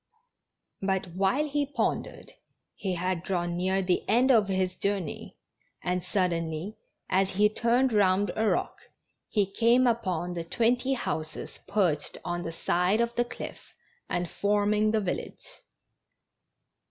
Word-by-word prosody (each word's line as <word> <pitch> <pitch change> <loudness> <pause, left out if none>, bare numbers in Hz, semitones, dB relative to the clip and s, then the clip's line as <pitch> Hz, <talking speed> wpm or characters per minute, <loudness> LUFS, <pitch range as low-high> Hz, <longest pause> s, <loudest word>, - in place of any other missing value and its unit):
Bat, 190 -2 -1
Avhile 220 +11 +2
he 290 0 0
pondered, 285 +1 -3 0.4
he 190 -3 -3
had 180 0 -1
drawn 175 -2 -2
near 190 +2 +1
the 180 -1 +1
end 250 +5 +4
of 220 -5 +5
his 185 -1 0
journey, 195 -5 -3 0.5
and 180 0 -1
suddenly 175 0 -1 0.3
as 190 +1 +1
he 205 +3 +5
turned 235 +3 +2
round 200 -1 +3
a 220 0 +1
rock - - 0 0.5
he 205 -3 +2
came 235 +6 +3
upon 185 -7 0
the 170 -1 -3
twenty 245 +8 +1
houses 160 -10 -4
perched 180 -8 0
on 175 0 -2
the 165 - -4
side 180 +5 +1
of 235 0 +1
the 240 - +2
cliff 240 - -9 0.3
and 175 0 0
forming 210 +3 +1
the 215 0 +2
village. 185 - -4
195 Hz, 135 wpm, -28 LUFS, 180-225 Hz, 0.5 s, of